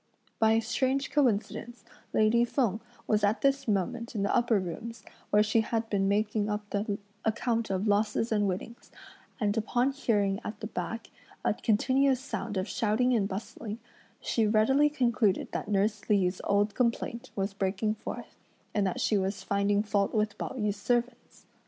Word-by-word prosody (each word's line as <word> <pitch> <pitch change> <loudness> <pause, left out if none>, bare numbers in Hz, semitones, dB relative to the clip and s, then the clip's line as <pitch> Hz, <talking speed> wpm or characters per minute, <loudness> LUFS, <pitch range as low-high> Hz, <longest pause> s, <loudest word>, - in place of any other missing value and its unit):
By 220 0 +5
a 225 - +3
strange 260 +4 0
coincidence 240 -2 0 0.3
lady 220 +2 +4
Feng 230 -4 0 0.2
was 210 -1 +1
at 205 +2 +2
this 275 -1 +2
moment 210 +3 -1
in 200 - 0
the 200 - +1
upper 235 -3 +3
rooms, 215 +5 -6 0.3
where 210 0 +5
she 215 +1 +2
had 225 0 -2
been 195 -1 +2
making 210 +1 +1
up 210 0 -3
the 205 0 -1 0.3
account 230 0 0
of 195 +2 -1
losses 210 +2 +1
and 205 -2 +2
winnings, 195 +6 -5 0.5
and 210 -3 +1
upon 245 +4 +1
hearing 205 -7 +1
at 210 0 -6
the - - -5
back 225 +1 -5 0.3
a - - +3
continuous 260 +5 +2
sound 230 -5 -4
of 185 +2 -1
shouting 245 +3 +1
and 210 -5 +2
bustling, 210 +2 -5 0.4
she 225 -2 +1
readily 265 +8 +4
concluded 235 -8 +1
that - - -3
nurse 205 +1 0
Li's 190 -3 +2
old 205 +1 +2
complaint 235 -1 -1
was 195 0 -1
breaking 195 +2 0
forth, - - -8 0.3
and 205 -2 +2
that 185 - -2
she 210 - +2
was 195 +1 -2
finding 200 +1 +1
fault 205 -1 0
with 210 -1 +1
Pao - - -4
yü's 210 -3 -1
servants. 240 +3 -2
215 Hz, 165 wpm, -29 LUFS, 205-235 Hz, 0.5 s, By